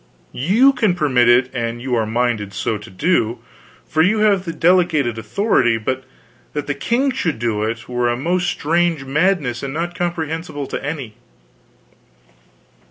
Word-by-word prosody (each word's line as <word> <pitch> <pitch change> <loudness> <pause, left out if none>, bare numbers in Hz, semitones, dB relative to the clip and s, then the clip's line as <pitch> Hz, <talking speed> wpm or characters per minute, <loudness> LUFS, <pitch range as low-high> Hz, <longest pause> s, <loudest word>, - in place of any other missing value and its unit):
You 220 - +4
can 215 -8 +1
permit 130 -8 +3
it 125 +2 +4
an 120 -1 -3
you 125 +1 -4
are 110 -2 +1
minded 110 -3 -1
so 105 +2 -2
to 105 +2 -12
do, 120 - 0 0.5
for 160 - +1
you 195 +7 +3
have 200 -3 +3
the 165 - -3
delegated 160 -8 +2
authority, 120 - +1
but 130 +4 -3 0.5
that 150 - -3
the 145 - -1
king 240 - 0
should 180 - -1
do 110 -2 -1
it 115 +2 -3
were 125 -1 0
a 120 - -1
most 175 +6 0
strange 165 -1 0
madness 145 -3 0
and 140 +1 -5
not 170 +2 -2
comprehensible 165 -3 -3
to - - -5
any." 135 -7 -5
140 Hz, 160 wpm, -19 LUFS, 120-175 Hz, 0.5 s, You